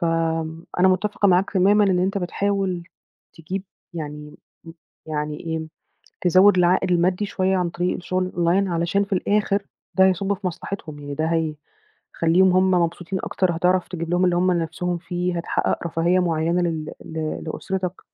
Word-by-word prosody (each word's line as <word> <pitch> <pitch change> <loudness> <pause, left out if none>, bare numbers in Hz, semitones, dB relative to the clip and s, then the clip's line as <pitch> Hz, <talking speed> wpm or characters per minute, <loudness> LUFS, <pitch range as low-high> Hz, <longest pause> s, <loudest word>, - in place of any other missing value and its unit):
فأنا 165 +1 0
متَّفقة 200 +2 +1
معاك 185 +2 +3
تمامًا 200 +3 +5
إن 185 -3 +2
أنت 195 +2 0
بتحاول 190 -1 -1 0.5
تجيب 185 +4 -5 0.3
يعني 150 -2 -7 0.3
م 165 - -10 0.3
يعني 150 -1 -3
إيه، 160 -1 -3 0.6
تزوّد 185 +2 +5
العائد 180 +1 +3
المادّي 180 +4 +2
شوية 190 -1 0
عن 180 -2 0
طريق 175 +1 -1
الشُغل 185 +1 -2
الOnline 175 +3 +2
علشان 170 +4 +1
في 200 - -16
الآخر 200 +1 +1 0.3
ده 190 - +5
هيصُب 195 +2 +1
في 195 0 -6
مصلحتهم، 165 -3 -5
يعني 145 0 -6
ده 155 +2 -1
هيخلّيهم 165 +2 0
هم 185 +1 +3
مبسوطين 175 +1 0
أكتر، 180 -3 0
هتعرف 180 +1 +2
تجيب 170 -1 -5
لهم 175 +1 +2
اللي 175 -1 +2
هم 185 +1 +3
نِفْسهم 175 +1 -2
فيه، 175 +1 -3
هتحقّق 170 0 -1
رفاهية 170 +3 +2
معيّنة 170 0 +1
لل 160 -2 -2
ل 160 -1 -4
لأسرتك. 185 +3 -4
180 Hz, 150 wpm, -23 LUFS, 165-185 Hz, 0.6 s, تمامًا